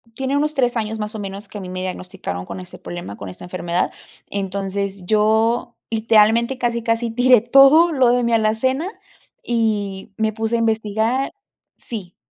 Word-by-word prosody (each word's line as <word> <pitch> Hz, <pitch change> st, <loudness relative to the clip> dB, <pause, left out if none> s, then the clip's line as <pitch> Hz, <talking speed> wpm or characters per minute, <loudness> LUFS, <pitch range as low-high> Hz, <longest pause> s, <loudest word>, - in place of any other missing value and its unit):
tiene 270 Hz, +1 st, -1 dB
unos 300 Hz, +1 st, 0 dB
3 245 Hz, -2 st, +1 dB
años 220 Hz, -1 st, -2 dB
más 210 Hz, +1 st, -4 dB
o 215 Hz, -, -6 dB
menos, 200 Hz, +1 st, -7 dB
que 205 Hz, -, -8 dB
a -, -, -7 dB
mí 180 Hz, -, -7 dB
me 185 Hz, 0 st, -4 dB
diagnosticaron 180 Hz, -, -5 dB
con -, -, -7 dB
este 180 Hz, 0 st, -11 dB
problema, 175 Hz, -12 st, -7 dB
con 100 Hz, -2 st, -8 dB
esta 90 Hz, -, -11 dB
enfermedad. 180 Hz, 0 st, -2 dB, 0.4 s
Entonces, 195 Hz, -1 st, -3 dB
yo, 220 Hz, +3 st, +2 dB
literalmente, 225 Hz, +3 st, +3 dB
casi, 235 Hz, -2 st, -1 dB
casi, 230 Hz, 0 st, 0 dB
tiré 245 Hz, -1 st, +5 dB
todo 275 Hz, +7 st, +6 dB
lo 260 Hz, -5 st, +3 dB
de 245 Hz, 0 st, +2 dB
mi 235 Hz, 0 st, +1 dB
alacena 260 Hz, -, +1 dB, 0.5 s
y 210 Hz, -4 st, -1 dB
me 220 Hz, -1 st, 0 dB
puse 225 Hz, +1 st, -1 dB
a -, -, +1 dB
investigar 225 Hz, +3 st, 0 dB, 0.4 s
sí. 195 Hz, -7 st, -7 dB
220 Hz, 170 wpm, -20 LUFS, 195-240 Hz, 0.5 s, todo